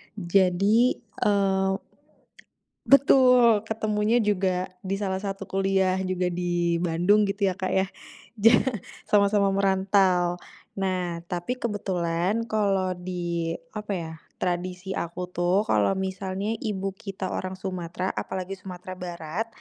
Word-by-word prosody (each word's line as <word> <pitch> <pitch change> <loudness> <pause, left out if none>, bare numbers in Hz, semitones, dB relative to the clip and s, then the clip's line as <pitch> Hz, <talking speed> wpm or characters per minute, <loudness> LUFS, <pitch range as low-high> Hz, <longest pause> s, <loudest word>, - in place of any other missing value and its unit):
Jadi 195 +5 +3 0.2
eee 195 -2 +2 1.1
betul, 250 -5 +6
ketemunya 215 +1 0
juga 190 -4 +1 0.2
di 195 +1 -2
salah 190 -1 -2
satu 195 -1 -4
kuliah 190 -1 +1
juga 185 -1 -1
di 175 -1 0
Bandung 180 +5 +3
gitu 200 0 0
ya, 190 - +1
Kak, 190 0 -3
ya, 190 0 +2 0.5
ja 225 0 +6 0.5
sama-sama 200 -1 +3
merantau. 190 -2 +2 0.4
Nah, 180 -3 -2
tapi 175 +7 -2
kebetulan 190 -2 -1
kalau 195 -3 +1
di 175 -2 -3 0.2
apa 210 -1 -5
ya, 165 -3 -4 0.2
tradisi 180 +1 -3
aku 180 +1 -4
tuh, 180 +3 +2
kalau 110 - +2
misalnya 190 +3 -3
ibu 195 -2 -2
kita 195 -1 -6
orang 185 0 -3
Sumatera, 185 -1 -4
apalagi 190 +1 -4
Sumatera 185 0 -9
Barat, 175 +3 -4
190 Hz, 115 wpm, -26 LUFS, 180-200 Hz, 1.1 s, betul